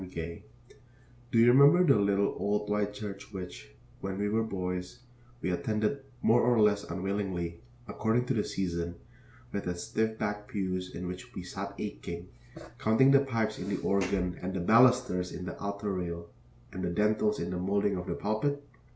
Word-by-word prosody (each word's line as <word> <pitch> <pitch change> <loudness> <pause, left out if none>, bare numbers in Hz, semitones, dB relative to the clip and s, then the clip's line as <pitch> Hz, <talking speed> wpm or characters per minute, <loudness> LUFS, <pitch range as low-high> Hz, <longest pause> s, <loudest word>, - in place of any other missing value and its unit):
Gay 85 +2 -6 0.9
Do - - +2
you 115 - +7
remember 140 +7 +7
the 140 -6 +5
little 100 0 +2
old 105 +1 0
white 105 0 +1
church 100 -1 -7
which, 90 - -8 0.2
when 95 0 -4
we 105 +1 0
were 110 +2 +2
boys, 90 0 -4 0.4
we 90 - +1
attended 105 +9 0 0.2
more 120 +2 +5
or 120 -2 +3
less 105 -1 +4
unwillingly, 90 -2 -3 0.3
according 115 +2 +1
to 130 - 0
the 110 - +1
season, 85 -2 -2 0.6
with 100 - -3
its 90 -1 -3
stiff 110 0 -1
backed 105 0 -3
pews 95 -5 -3
in 90 - -5
which 90 +1 -8
we 90 - -5
sat 100 +2 -6
aching, 90 -4 -6 0.5
counting 130 +5 +5
the 140 - +7
pipes 115 -6 -1
in 90 +3 -4
the 100 - -1
organ 95 -2 0
and 95 +1 -3
the - - -1
balusters 115 -2 +4
in 90 - -6
the - - -5
altar 100 0 -3
rail 85 -2 -4 0.4
and 95 -1 -4
the 90 - 0
dentils 105 +3 +2
in 85 +1 -3
the 90 - -2
moulding 100 +2 +1
of 90 0 -5
the 85 - -2
pulpit? 140 +7 -1
100 Hz, 175 wpm, -30 LUFS, 90-110 Hz, 0.9 s, you